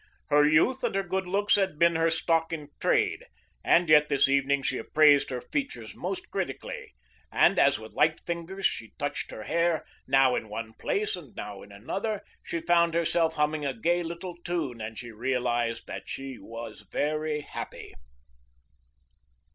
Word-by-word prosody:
Her 145 0 +6
youth 235 +13 +3
and - - 0
her 195 - +1
good 190 +1 -2
looks 200 +3 +2
had 190 -6 0
been 170 +1 +4
her 165 0 +3
stock 165 0 +1
in 150 -3 -5
trade, - - +1 0.4
and 175 0 +4
yet 150 -1 +6
this 140 -1 +4
evening 140 0 +2
she 130 - -1
appraised 145 +3 +5
her 125 - -3
features 280 -1 -4
most 355 -1 -5
critically, - - -5 0.4
and - - +4
as - - +5
with - - -11
light - - +3
fingers 175 +3 -4
she 110 -2 -1
touched - - -3
her 110 - -7
hair, 170 +3 +1 0.2
now 135 -2 +5
in 110 - -4
one 110 +1 -5
place 205 - -1
and 160 -9 -12
now 100 -2 -7
in 100 - -13
another, 195 - -3 0.2
she 170 - -4
found 170 -1 +3
herself 165 -1 +2
humming 150 0 0
a 135 -2 -1
gay 175 +6 +2
little 170 +1 -6
tune 150 -10 -2
and 110 0 -6
she 120 +1 -7
realized 120 -1 -1
that - - -7
she 135 -2 -6
was 115 -1 -8
very 150 0 -1
happy. - - -8
155 Hz, 170 wpm, -28 LUFS, 130-175 Hz, 0.4 s, Her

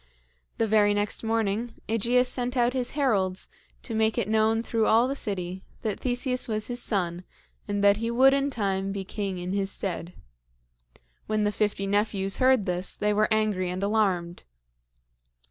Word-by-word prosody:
The 225 - +2
very 210 -1 +3
next 205 0 0
morning, 225 +1 -1
AEgeus 235 +3 +2
sent 250 +1 -1
out 240 0 +2
his 255 -2 -2
heralds, 195 -9 0 0.4
to 230 - -6
make 220 0 +1
it - - 0
known 220 +1 +2
through 225 -2 0
all 230 +3 +4
the 275 - -2
city 185 -6 -4 0.2
that 215 -3 -2
Theseus 250 0 0
was 215 -2 -2
his 245 0 -2
son, 180 -4 0 0.4
and 205 -1 -1
that 200 0 +5
he 230 +1 -2
would 260 +3 +5
in 275 0 +1
time 195 -5 -1
be 195 0 -4
king 195 -1 -4
in 180 +1 -4
his 195 -1 0
stead. 180 -3 -4 1.1
When 215 -1 0
the 210 - +1
fifty 205 -1 -1
nephews 200 -1 0
heard 255 -5 +3
this, 180 0 -1
they 210 0 +1
were 215 +1 +1
angry 210 -4 +1
and 185 +2 -4
alarmed. 190 -5 0
210 Hz, 170 wpm, -26 LUFS, 195-230 Hz, 1.1 s, that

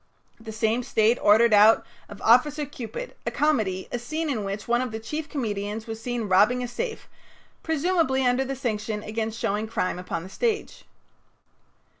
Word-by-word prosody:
The 225 -1 -8
same 220 +2 0
State 225 0 +2
ordered 220 +2 +5
out 210 +2 +6 0.2
of - - -11
"Officer 290 +6 +4
Cupid," 290 - -7
a - - +3
comedy, 220 -12 0
a 245 - -2
scene 310 +6 -3
in 220 -6 -2
which 200 +1 -5
one 240 +1 +2
of 255 -2 -3
the 220 - -4
chief 300 +7 -5
comedians 215 -5 -3
was 225 -1 -7
seen 245 -1 -3
robbing 210 +7 +4
a - - -3
safe, 450 - -5 0.5
presumably 320 -4 +1
under 250 +2 +2
the 270 +1 -4
section 215 -4 -3
against 220 +1 -3
showing 210 +1 -1
crime 185 -5 -2
upon 170 -2 -4
the 185 - -10
stage. 445 - -2
230 Hz, 170 wpm, -25 LUFS, 215-270 Hz, 0.5 s, out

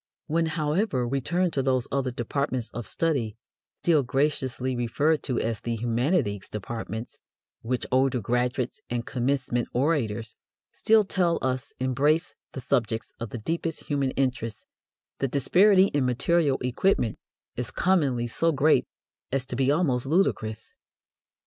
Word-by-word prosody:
When, 165 +1 +1
however, 155 - 0
we 135 +2 -1
turn 175 +6 +1
to 135 - 0
those 130 -2 +1
other 135 -1 0
departments 125 0 -2
of 120 -1 -6
study 130 -10 -1 0.5
still 160 -4 +4
graciously 130 -1 -1
referred 140 +6 +1
to 125 -4 -1
as 115 -2 -1
the 120 -1 -3
"humanities," 120 - 0
departments 110 +2 -6 0.4
which 125 +1 -2
older 130 0 +3
graduates 125 +3 -1
and 120 -1 -2
commencement 130 -1 -1
orators 120 -5 0 0.4
still 220 -1 +4
tell 180 -3 +1
us 130 +1 -1
embrace 145 +6 +1 0.2
the 130 - -5
subjects 115 -3 -1
of 115 -1 -4
the 120 - -5
deepest 165 +7 -3
human 140 -2 0
interest, 125 -4 -1 0.5
the 135 - +1
disparity 185 - +4
in 145 -2 +1
material 140 +3 +2
equipment 125 - +1 0.4
is 125 -1 -3
commonly 145 -10 +1
so 165 +8 +1
great 150 +1 +3 0.4
as 135 -1 0
to 130 - -5
be 130 +1 +2
almost 140 -5 +1
ludicrous. 120 - 0
130 Hz, 135 wpm, -26 LUFS, 120-155 Hz, 0.5 s, still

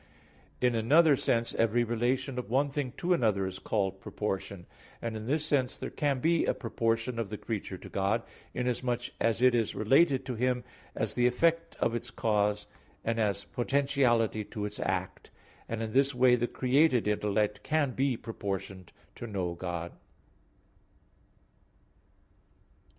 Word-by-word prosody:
In 125 -1 +3
another 145 +7 +5
sense 115 -2 0
every 115 +1 +2
relation 125 +3 -1
of 120 - -6
one 140 +4 +2
thing 140 -3 -2
to 180 +1 +1
another 105 - +2
is 95 0 -5
called 95 -3 -1
proportion. 95 -3 -4 0.3
And 115 -1 -4
in 110 +1 -6
this 150 +3 0
sense 135 -4 +1
there - - -5
can 140 -3 0
be 165 +2 +3
a - - +1
proportion 115 0 -1
of 110 -4 -2
the 105 - -5
creature 100 -4 -4
to - - -11
God, 100 +4 0 0.3
inasmuch 125 -1 -1
as 115 +1 +1
it 130 -1 +6
is 115 -3 0
related 135 +4 +3
to 130 - -3
Him 125 +1 0 0.3
as - - -1
the 125 0 +3
effect 165 +6 +1
of - - +1
its 120 - -4
cause, 105 -1 0 0.4
and 115 0 0
as 100 -2 0
potentiality 120 -3 +1
to 105 0 -5
its 105 - -6
act; - - -3 0.4
and 115 0 -2
in 110 - -4
this 135 +3 +2
way 125 0 +5
the 120 0 0
created 130 -2 +2
intellect 105 0 0
can 150 -3 +1
be 130 -1 0
proportioned 95 -4 -5 0.3
to 120 - -6
know 95 -5 -2
God. 85 -1 -4
120 Hz, 155 wpm, -30 LUFS, 105-130 Hz, 0.4 s, it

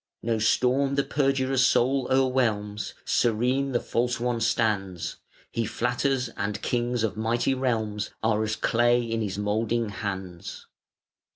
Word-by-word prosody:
No 115 -1 0
storm 130 +5 +2
the 140 - +2
perjurer's 135 -2 +1
soul 130 +1 +3
o'erwhelms, 120 -6 0
Serene 125 +4 +1
the 120 - +1
false 120 +1 -1
one 120 -1 -1
stands: 105 -6 0 0.3
He 115 - -1
flatters, 125 +3 0
and 100 -1 -3
Kings 120 -1 0
of 105 -3 -1
mighty 115 +4 +1
realms 110 -5 -1
Are 110 -1 +2
as 110 0 -1
clay 120 +2 +2
in 115 -1 -2
his 100 -3 -3
moulding 110 +2 0
hands. 95 -4 -6
115 Hz, 130 wpm, -26 LUFS, 105-125 Hz, 0.3 s, soul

